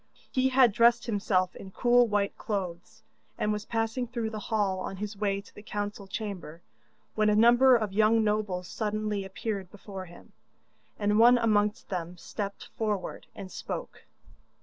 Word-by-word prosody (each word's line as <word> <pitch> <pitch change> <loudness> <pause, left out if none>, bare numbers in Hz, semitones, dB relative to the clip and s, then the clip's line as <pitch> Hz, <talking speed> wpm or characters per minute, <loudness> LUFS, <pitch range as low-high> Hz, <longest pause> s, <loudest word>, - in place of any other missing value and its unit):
He 260 0 +2
had 255 -3 +5
dressed 235 +3 +4
himself 195 -5 0
in 190 - -9
cool 245 +4 +4
white 205 -2 0
clothes, 195 0 -5 0.3
and 210 - 0
was 210 0 -4
passing 225 +2 -1
through 230 -2 -3
the 215 - -5
hall 205 -4 +1
on 190 - -5
his 210 +1 -5
way 200 -1 -1
to - - -19
the - - -11
council 205 -1 -5
chamber, 190 -6 -6 0.5
when 215 -1 +2
a 210 - +3
number 240 +4 +6
of 215 -4 -1
young 220 +2 +4
nobles 205 -4 -1
suddenly 210 -1 -2
appeared 195 0 -4
before 195 -1 -8
him, 175 0 -15 0.7
and 210 +1 +2
one 240 +2 +7
amongst 210 -2 +1
them 180 -1 -4
stepped 200 +2 -6
forward 210 -4 -2
and 190 -2 -8
spoke. - - -6
210 Hz, 160 wpm, -28 LUFS, 195-225 Hz, 0.7 s, one